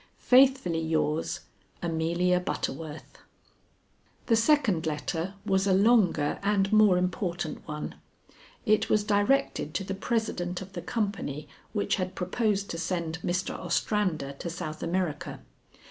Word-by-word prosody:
Faithfully 260 -10 +4
yours, 160 -1 0 0.4
"AMELIA 170 +2 +1
BUTTERWORTH." 160 -3 -5 1.1
The 230 - +4
second 225 - +3
letter 160 +5 -2
was 190 +1 +2
a 190 - +4
longer 195 -8 +3
and 200 0 +1
more 210 -4 +6
important 180 -2 -2
one. 150 -1 -5 0.7
It 215 -2 +3
was 210 -1 +3
directed 205 - +1
to 195 - 0
the 195 - -4
president 195 -4 -2
of 190 +1 -10
the 175 - -5
company 195 -11 -3 0.2
which 205 -2 0
had 185 -1 -3
proposed 200 +2 0
to 165 - -4
send 165 -1 -2
Mr. 180 +3 -1
Ostrander 180 -10 -1
to 170 - -4
South 155 -2 -5
America. 170 -3 -2
180 Hz, 125 wpm, -28 LUFS, 165-205 Hz, 1.1 s, more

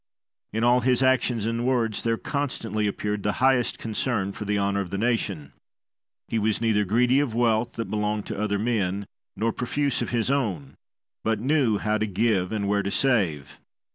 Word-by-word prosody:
In 110 +2 -1
all 120 +1 +5
his 125 +1 +2
actions 125 -4 +2
and 115 +1 -1
words 120 -4 0
there 115 -1 0
constantly 115 -8 -2
appeared 105 +1 -2
the 105 +1 0
highest 130 -2 +2
concern 110 -3 -2
for 105 - -7
the 105 0 0
honour 100 0 +1
of 95 - -5
the 100 - -3
nation. 100 - -1 0.7
He 115 - -1
was 110 0 +1
neither 110 -2 +2
greedy 125 +7 +3
of 135 -6 -1
wealth 115 -1 +1
that 115 - -3
belonged 105 0 -1
to - - -4
other 105 -1 0
men 100 -3 -1 0.3
nor 115 0 0
profuse 140 +2 -1
of - - -2
his 120 +1 0
own, 95 - -1 0.5
but 110 -1 0
knew 130 -3 +2
how 110 +1 0
to 110 - 0
give 100 -2 +1
and 105 -2 -1
where 100 0 +2
to 100 - -2
save. 100 - 0
110 Hz, 185 wpm, -25 LUFS, 100-120 Hz, 0.7 s, all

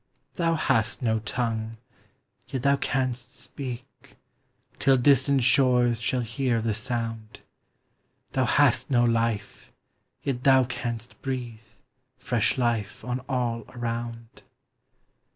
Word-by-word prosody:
Thou 165 -2 +1
hast 115 -5 +1
no 110 -2 +2
tongue, 110 0 -3 0.7
yet 130 -2 -4
thou 140 0 +4
canst 130 -2 -2
speak, 130 -1 -8 0.6
Till 135 -1 +4
distant 135 0 +4
shores 125 -2 +4
shall 125 +1 0
hear 115 +1 0
the 110 -1 0
sound; 115 -1 -3 0.9
Thou 130 -1 +1
hast 130 -2 +3
no 120 -3 +3
life, 115 -3 -1 0.5
yet 130 -3 -2
thou 130 -1 +6
canst 120 -2 -5
breathe 125 -4 -4 0.6
Fresh 120 0 +1
life 115 -4 -1
on 125 0 -2
all 120 -3 -1
around. 115 -1 -5
120 Hz, 110 wpm, -26 LUFS, 115-130 Hz, 0.9 s, thou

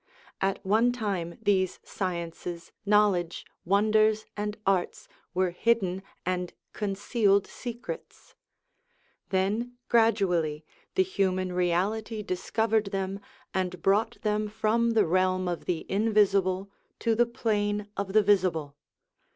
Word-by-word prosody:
At 195 0 -1
one 220 +5 +4
time 195 -8 -3
these 190 -3 +2
sciences, 170 -2 -5 0.2
knowledge, 200 -5 +2 0.2
wonders, 215 +3 +3
and 210 0 -3
arts 190 -2 0 0.3
were 185 -1 +2
hidden 190 -2 +1 0.2
and 180 -1 -1 0.2
concealed 200 0 +1
secrets; 245 - -8 1.0
then 205 +6 0 0.2
gradually 180 -10 +2 0.3
the 380 - +5
human 185 - 0
reality 200 +5 0
discovered 220 +3 0
them, 195 0 -3 0.3
and 180 -1 -1
brought 215 +4 +2
them 210 0 +1
from 230 +2 +1
the 210 - +5
realm 185 +1 +1
of 175 -1 -3
the 170 -3 -2
invisible 200 -2 +2 0.3
to 230 - +1
the 240 +2 +3
plane 210 -4 -1
of 200 -1 -3
the 215 0 +5
visible. 180 -8 +2
200 Hz, 110 wpm, -28 LUFS, 185-215 Hz, 1.0 s, the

